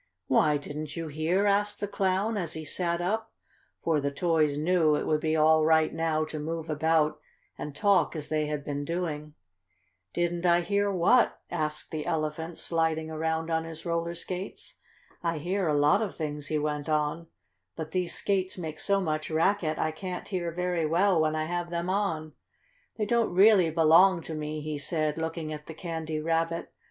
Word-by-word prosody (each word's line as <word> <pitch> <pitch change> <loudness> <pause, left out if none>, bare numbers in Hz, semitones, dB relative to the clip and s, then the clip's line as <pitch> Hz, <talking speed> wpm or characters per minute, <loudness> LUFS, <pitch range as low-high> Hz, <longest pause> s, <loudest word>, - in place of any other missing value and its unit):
"Why, 150 +3 +3
didn't 150 +1 -6
you 165 -1 -4
hear?" 160 +7 +1
asked 205 +1 +1
the 205 - -2
Clown, 195 +3 0
as 175 -6 -2
he 160 -1 -6
sat 170 +2 -1
up, 220 +5 -1 0.5
for 160 -3 +2
the 140 - 0
toys 155 -1 +1
knew 160 -1 +3
it - - -2
would 155 -1 +1
be 155 0 +1
all 155 0 +5
right 160 0 +3
now 160 -1 0
to 155 0 -6
move 160 +1 -4
about 155 0 +2 0.4
and 145 -1 -7
talk 200 -1 +3
as 150 -2 -4
they 155 -1 0
had 150 -1 -3
been 145 0 -3
doing. 150 -2 -4 0.8
"Didn't 175 0 -1
I 175 -1 +4
hear 200 +3 +1
what?" 200 +7 +3
asked 155 -3 -2
the 155 -1 -4
Elephant, 160 +1 -2
sliding 160 -1 0
around 160 +1 -2
on 160 0 +1
his 160 0 -8
roller 170 0 -1
skates. 185 +3 -6 0.4
"I 165 -1 -1
hear 180 +4 -1
a 150 -1 +2
lot 145 +6 +4
of 210 -4 -3
things," 150 -2 -4
he 155 - 0
went 150 0 -2
on, 155 +2 0 0.5
"but 160 -1 -6
these 180 -1 0
skates 190 0 0
make 160 -3 -5
so 200 -1 +2
much 155 -3 -2
racket 165 0 +1
I 155 - 0
can't 180 +3 -6
hear 175 -4 -2
very 175 -1 -1
well 175 +1 +3
when 155 0 +1
I 155 - 0
have 175 +1 -3
them 170 +1 -2
on. 165 -6 -1 0.6
They 215 - 0
don't 235 +1 +2
really 195 -3 +6
belong 165 +3 +5
to 160 - -6
me," 155 0 -4
he 150 -1 -4
said, 155 0 -1
looking 160 -1 -3
at 150 0 -9
the 160 - -8
Candy 160 -3 -4
Rabbit. 165 +1 -1
160 Hz, 185 wpm, -28 LUFS, 155-180 Hz, 0.8 s, really